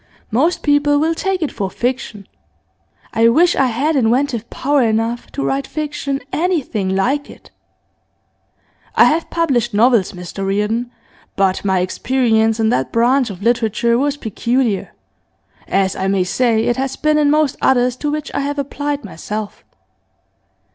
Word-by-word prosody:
'Most 300 +11 +1
people 290 0 +3
will 320 +3 +1
take 375 +1 -1
it 300 - -2
for 195 -2 -3
fiction. 235 -4 -3 0.9
I 230 +1 +4
wish 340 +8 +4
I 270 - +3
had 275 +7 0
inventive 245 -1 +1
power 285 +1 +1
enough 225 +1 -1
to 280 - -2
write 270 0 -1
fiction 290 -2 -3
anything 270 - -1
like 270 +9 0
it. - - -15 1.4
I - - +7
have 325 +2 +1
published 245 -9 0
novels, 230 -3 +3
Mr 180 +2 -7
Reardon, 210 +5 -1 0.5
but 190 -1 +1
my 190 -2 +1
experience 225 +2 +1
in 220 -1 +2
that 130 -6 0
branch 245 +2 +2
of 195 -1 -8
literature 235 0 +1
was 285 +3 0
peculiar 235 -2 -1 0.8
as 195 -1 +1
I 190 - -2
may 195 -1 +2
say 220 +4 +1
it 240 +1 0
has 270 0 -2
been 305 0 +1
in 295 -1 +3
most 300 -2 +2
others 250 -1 +2
to 295 - -2
which 300 0 -4
I - - -1
have 285 +1 -2
applied 285 -1 -3
myself. 210 +4 -6
245 Hz, 150 wpm, -18 LUFS, 215-285 Hz, 1.4 s, I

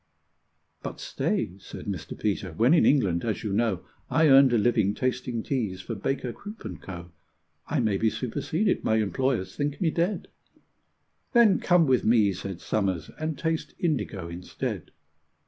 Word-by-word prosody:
"But - - -6
stay," 95 +3 -2
said - - -9
Mr. 95 -6 -5
Peter; 100 -4 -1
"when 120 - +4
in 170 - +5
England, 100 - +3
as 110 -4 -2
you 105 -3 -2
know, 105 -4 0 0.2
I 160 -1 +4
earned 135 -1 +7
a 120 - +4
living 110 -2 +2
tasting 125 -2 -2
teas 110 -9 -2
for 115 - -5
Baker, 120 +3 -2
Croop, 210 - -10
and 90 -6 -7
Co., 85 -2 -8 0.6
I 150 -4 0
may 105 -4 +1
be 110 +2 +2
superseded 155 - -1
my 110 - +2
employers 110 -2 0
think 145 0 -2
me 165 -3 +2
dead!" 175 +6 -1 1.1
"Then 235 -5 +6
come 175 -2 +4
with 130 -3 +3
me," 110 -3 +4
said 95 0 -6
Somers, 95 -6 -1
"and 155 -1 -2
taste 160 -1 -2
indigo 110 - -1
instead." 85 +1 -5
115 Hz, 160 wpm, -27 LUFS, 95-145 Hz, 1.1 s, earned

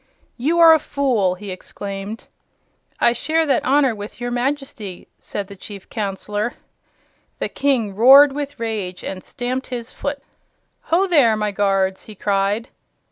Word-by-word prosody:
"You 310 +8 0
are 330 -1 +9
a 320 - +4
fool!" 245 -12 0
he 195 +1 -8
exclaimed. 195 +3 -7 0.8
"I 235 - +4
share 315 +5 0
that 280 - +1
honor 270 -1 +3
with 205 +1 -9
your 245 0 -3
Majesty," 245 -6 -3
said 205 - -5
the 200 - -10
Chief 200 0 -10
Counselor. 210 +1 -3 0.8
The - - -2
King 255 -8 0
roared 270 +7 +8
with 285 -1 -5
rage 210 -6 -3
and 185 -1 -5
stamped 255 0 -4
his 245 -1 -5
foot. 285 0 -4 0.7
"Ho, 355 +4 +3
there, 280 - +4
my 210 -1 -1
guards!" 195 -1 0
he 215 - -11
cried. 200 +3 0
230 Hz, 145 wpm, -20 LUFS, 200-275 Hz, 0.8 s, are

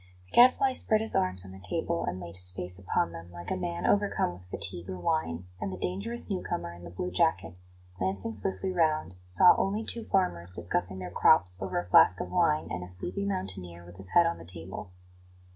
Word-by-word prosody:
The 90 - -26
Gadfly 255 +2 +6
spread 215 -3 +2
his 220 - -2
arms 90 0 0
on 95 - -11
the 95 - -11
table, 85 -2 -2
and 90 +1 -4
laid 85 -1 -8
his 90 0 +6
face 90 0 -5
upon 90 -3 -1
them, 85 +1 -10
like 85 0 -8
a - - +1
man 85 -1 -4
overcome 205 - +1
with 90 +1 -14
fatigue 90 -1 -1
or 95 - -5
wine; 90 - -2
and 95 - -3
the 95 - -6
dangerous 200 - -1
new 190 -4 -2
comer 85 0 -4
in 85 0 -13
the 85 - -8
blue 90 +1 -5
jacket, 90 -1 0 0.4
glancing 95 +4 -1
swiftly 100 - -2
round, 155 - 0
saw 90 - +6
only 205 +3 -1
two 230 0 -1
farmers 90 - 0
discussing 90 +2 -1
their 90 -1 -7
crops 90 0 +5
over 95 -1 -3
a 90 - -5
flask 90 0 +6
of - - -5
wine 165 -4 +2
and 90 0 -4
a - - -8
sleepy 135 - -4
mountaineer 95 - -4
with 90 0 -14
his 95 -1 -3
head 175 - +7
on 170 - -1
the - - -9
table. 90 +3 -8
90 Hz, 215 wpm, -29 LUFS, -, 0.4 s, head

